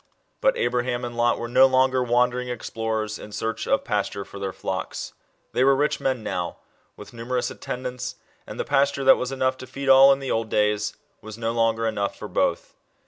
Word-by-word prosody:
But -, -, +3 dB
Abraham 125 Hz, 0 st, -1 dB
and 120 Hz, 0 st, -6 dB
Lot 120 Hz, 0 st, +2 dB
were 120 Hz, -, -4 dB
no 130 Hz, +2 st, +6 dB
longer 130 Hz, 0 st, +3 dB
wandering 125 Hz, +1 st, +1 dB
explorers, 110 Hz, -2 st, -3 dB
in 105 Hz, -, -10 dB
search 110 Hz, +1 st, -3 dB
of 135 Hz, -, +2 dB
pasture 100 Hz, -4 st, -2 dB
for 100 Hz, -, -10 dB
their 100 Hz, -1 st, -3 dB
flocks. 95 Hz, -1 st, -5 dB, 0.4 s
They 125 Hz, -, +2 dB
were 135 Hz, +1 st, +5 dB
rich 145 Hz, +2 st, 0 dB
men 130 Hz, -4 st, -1 dB
now, 90 Hz, -4 st, -3 dB, 0.4 s
with -, -, -12 dB
numerous 120 Hz, +2 st, -2 dB
atten 130 Hz, -1 st, -6 dB
dants, 125 Hz, 0 st, -5 dB, 0.3 s
and -, -, -8 dB
the -, -, -1 dB
pasture 140 Hz, 0 st, +1 dB
that 135 Hz, -, +7 dB
was 125 Hz, +1 st, -3 dB
enough 130 Hz, -1 st, 0 dB
to 130 Hz, -, -9 dB
feed 140 Hz, 0 st, -4 dB
all, 135 Hz, +1 st, +8 dB
in 135 Hz, -, +3 dB
the 135 Hz, -1 st, -4 dB
old 115 Hz, -1 st, -1 dB
days, 105 Hz, 0 st, +1 dB, 0.3 s
was 110 Hz, 0 st, -9 dB
no 115 Hz, 0 st, -1 dB
longer 115 Hz, -1 st, +1 dB
enough 100 Hz, -3 st, -2 dB
for -, -, -7 dB
both. -, -, -1 dB
120 Hz, 200 wpm, -24 LUFS, 110-130 Hz, 0.4 s, all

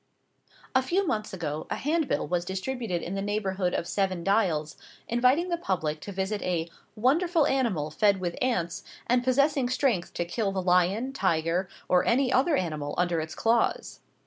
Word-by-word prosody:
) -, -, -45 dB, 0.3 s
A 260 Hz, -, +6 dB
few 360 Hz, +9 st, 0 dB
months 215 Hz, -9 st, -2 dB
ago 155 Hz, -5 st, -4 dB
a -, -, -1 dB
handbill 310 Hz, +1 st, 0 dB
was 175 Hz, -1 st, 0 dB
distributed 190 Hz, 0 st, -3 dB
in 180 Hz, -, -4 dB
the 195 Hz, -, -2 dB
neighbourhood 195 Hz, -3 st, -1 dB
of 170 Hz, -, -2 dB
Seven 190 Hz, -3 st, -1 dB
Dials, 170 Hz, -7 st, +1 dB, 0.3 s
inviting 255 Hz, +9 st, +2 dB
the 345 Hz, -1 st, -1 dB
public 160 Hz, -, -1 dB
to 200 Hz, -, -8 dB
visit 195 Hz, +2 st, -2 dB
a 170 Hz, -2 st, -1 dB, 0.3 s
"wonderful 310 Hz, +8 st, +2 dB
animal 225 Hz, -, 0 dB
fed 200 Hz, +4 st, +3 dB
with 175 Hz, -2 st, -3 dB
ants, 190 Hz, -7 st, -1 dB, 0.2 s
and 245 Hz, +1 st, +2 dB
possessing 270 Hz, 0 st, +2 dB
strength 255 Hz, -8 st, 0 dB
to 175 Hz, -, -1 dB
kill 195 Hz, +3 st, -1 dB
the 195 Hz, -, -2 dB
lion, 185 Hz, +8 st, +2 dB
tiger, 175 Hz, -3 st, 0 dB, 0.2 s
or 180 Hz, -1 st, +4 dB
any 255 Hz, +2 st, +2 dB
other 285 Hz, +5 st, +3 dB
animal 155 Hz, -, -2 dB
under 175 Hz, -2 st, +1 dB
its 160 Hz, 0 st, -5 dB
claws." 230 Hz, +1 st, 0 dB
195 Hz, 170 wpm, -27 LUFS, 175-255 Hz, 0.3 s, A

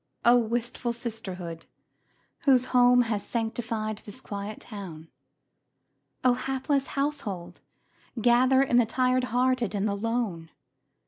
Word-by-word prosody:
Oh, 240 Hz, +1 st, +7 dB
wistful 235 Hz, +1 st, -2 dB
sisterhood, 190 Hz, -8 st, -6 dB, 0.8 s
whose 255 Hz, -3 st, +5 dB
home 245 Hz, 0 st, +6 dB
Has 215 Hz, -3 st, -2 dB
sanctified 225 Hz, -2 st, -3 dB
this 215 Hz, +5 st, -9 dB
quiet 205 Hz, -2 st, -6 dB
town! 175 Hz, -7 st, -9 dB, 1.1 s
Oh, 250 Hz, -1 st, +5 dB
hapless 270 Hz, +2 st, -1 dB
household, 250 Hz, -12 st, -3 dB, 0.6 s
gather 255 Hz, +3 st, +5 dB
in 245 Hz, -3 st, +2 dB
The 240 Hz, -2 st, +4 dB
tired 255 Hz, +1 st, +1 dB
hearted 250 Hz, -3 st, +1 dB
and 200 Hz, +1 st, 0 dB
the 200 Hz, -, 0 dB
lone! 200 Hz, -6 st, -2 dB
235 Hz, 115 wpm, -27 LUFS, 205-255 Hz, 1.1 s, Oh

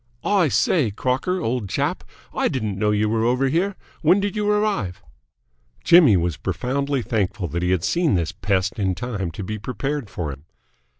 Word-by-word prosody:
"I 195 Hz, -5 st, +3 dB
say, 145 Hz, -2 st, +2 dB
Crocker, 130 Hz, -, -1 dB
old 120 Hz, -, -2 dB
chap, -, -, -1 dB, 0.3 s
I -, -, +1 dB
didn't 110 Hz, -7 st, -2 dB
know 105 Hz, 0 st, +2 dB
you 105 Hz, 0 st, +2 dB
were 110 Hz, +1 st, 0 dB
over 125 Hz, +3 st, +2 dB
here. 185 Hz, +7 st, 0 dB, 0.3 s
When 175 Hz, +5 st, +4 dB
did 200 Hz, +1 st, -2 dB
you 210 Hz, 0 st, 0 dB
arrive?" 205 Hz, -, 0 dB, 0.8 s
Jimmy 155 Hz, -, +7 dB
was 85 Hz, -2 st, -1 dB
profoundly 135 Hz, +7 st, -2 dB
thankful 105 Hz, -4 st, -1 dB
that 85 Hz, +4 st, -3 dB
he 90 Hz, -, 0 dB
had 90 Hz, -3 st, +1 dB
seen 170 Hz, -, +2 dB
this 85 Hz, 0 st, 0 dB
pest 100 Hz, +2 st, -1 dB
in 95 Hz, -2 st, 0 dB
time 100 Hz, -3 st, -3 dB
to 85 Hz, +5 st, -7 dB
be 110 Hz, +3 st, -4 dB
prepared 135 Hz, +2 st, -3 dB
for 85 Hz, -7 st, -4 dB
him. 70 Hz, +3 st, -14 dB
115 Hz, 180 wpm, -22 LUFS, 95-150 Hz, 0.8 s, Jimmy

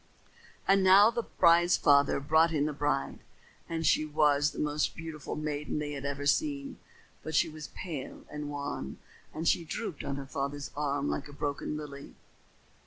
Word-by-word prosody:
And 195 Hz, 0 st, +4 dB
now 195 Hz, +4 st, +7 dB
the 235 Hz, 0 st, -1 dB
bride's 175 Hz, -4 st, +4 dB
father 140 Hz, -2 st, +4 dB
brought 160 Hz, +4 st, +3 dB
in 150 Hz, -2 st, +1 dB
the 150 Hz, -, -2 dB
bride, 145 Hz, -1 st, -1 dB, 0.5 s
and 165 Hz, -1 st, -2 dB
she 155 Hz, -, +4 dB
was 150 Hz, -1 st, +3 dB
the -, -, -12 dB
most 150 Hz, 0 st, 0 dB
beautiful 160 Hz, -3 st, -6 dB
maiden 150 Hz, -1 st, -3 dB
they 150 Hz, -1 st, -3 dB
had 140 Hz, -1 st, -5 dB
ever 140 Hz, 0 st, -3 dB
seen. 280 Hz, -, 0 dB, 0.4 s
But 155 Hz, 0 st, -5 dB
she -, -, +4 dB
was 155 Hz, -1 st, -8 dB
pale 155 Hz, -8 st, -7 dB
and 150 Hz, 0 st, -5 dB
wan 140 Hz, -, -5 dB, 0.3 s
and 160 Hz, +1 st, -4 dB
she 170 Hz, -, +3 dB
drooped 165 Hz, 0 st, -5 dB
on 140 Hz, -, -3 dB
her 140 Hz, -1 st, -6 dB
father's 140 Hz, 0 st, -4 dB
arm 145 Hz, -, -1 dB
like 70 Hz, 0 st, -2 dB
a 145 Hz, -, -12 dB
broken 145 Hz, +1 st, -3 dB
lily. 140 Hz, -2 st, -9 dB
150 Hz, 175 wpm, -30 LUFS, 145-165 Hz, 0.5 s, now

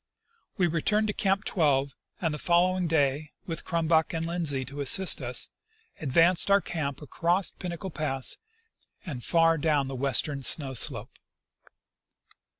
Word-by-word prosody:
We 185 Hz, -, +2 dB
returned 175 Hz, +6 st, 0 dB
to -, -, -1 dB
Camp 195 Hz, 0 st, 0 dB
12, 140 Hz, -5 st, 0 dB, 0.3 s
and 165 Hz, -4 st, -1 dB
the 150 Hz, -, -5 dB
following 180 Hz, +1 st, +1 dB
day, 145 Hz, -1 st, 0 dB
with 165 Hz, -2 st, -5 dB
Crumback 165 Hz, -2 st, 0 dB
and 165 Hz, 0 st, -2 dB
Lindsley 160 Hz, -6 st, -1 dB
to 140 Hz, +3 st, -7 dB
assist 185 Hz, +7 st, +4 dB
us, -, -, +1 dB, 0.5 s
advanced 165 Hz, +6 st, +2 dB
our 200 Hz, 0 st, +5 dB
camp 150 Hz, -6 st, -5 dB
across 175 Hz, +5 st, 0 dB
Pinnacle 180 Hz, +1 st, -7 dB
pass 135 Hz, -4 st, -1 dB, 0.7 s
and 135 Hz, -9 st, -7 dB
far 165 Hz, -1 st, +2 dB
down 145 Hz, -2 st, +1 dB
the 135 Hz, 0 st, -6 dB
western 140 Hz, +2 st, 0 dB
snow 135 Hz, 0 st, +2 dB
slope. 125 Hz, -, +2 dB
160 Hz, 140 wpm, -27 LUFS, 140-175 Hz, 0.7 s, our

